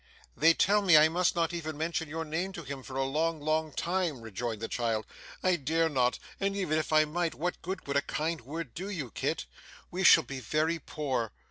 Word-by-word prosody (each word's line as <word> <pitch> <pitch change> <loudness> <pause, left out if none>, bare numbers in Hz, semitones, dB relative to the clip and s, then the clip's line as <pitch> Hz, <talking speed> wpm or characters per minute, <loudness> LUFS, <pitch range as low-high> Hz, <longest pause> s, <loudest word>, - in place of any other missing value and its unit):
'They 165 +2 +6
tell 205 +2 +4
me 180 -6 +7
I 155 +1 +7
must 175 +2 +1
not 170 0 +1
even 160 -3 -4
mention 160 0 -2
your 160 +2 -3
name 170 +5 -2
to 170 - -7
him 140 -1 -6
for 130 0 -9
a 135 - +1
long, 155 +4 0
long 155 +1 0
time,' 170 -4 -1
rejoined 115 0 -4
the 115 - -3
child, 115 -3 -1 0.4
'I 185 -1 +3
dare 160 +3 +1
not; 125 -4 +1 0.2
and 195 0 0
even 155 -5 +1
if 155 - -3
I 155 0 +5
might, 165 +2 -1
what 175 +3 -3
good 190 +3 -5
would 140 0 0
a - - +3
kind 155 +3 -2
word 145 +1 -6
do 190 +3 -5
you, 155 - -4
Kit? - - -2 0.5
We 185 +2 -2
shall 165 -2 +8
be 135 -1 -6
very 155 +7 0
poor. 130 -7 -2
155 Hz, 220 wpm, -30 LUFS, 140-170 Hz, 0.5 s, shall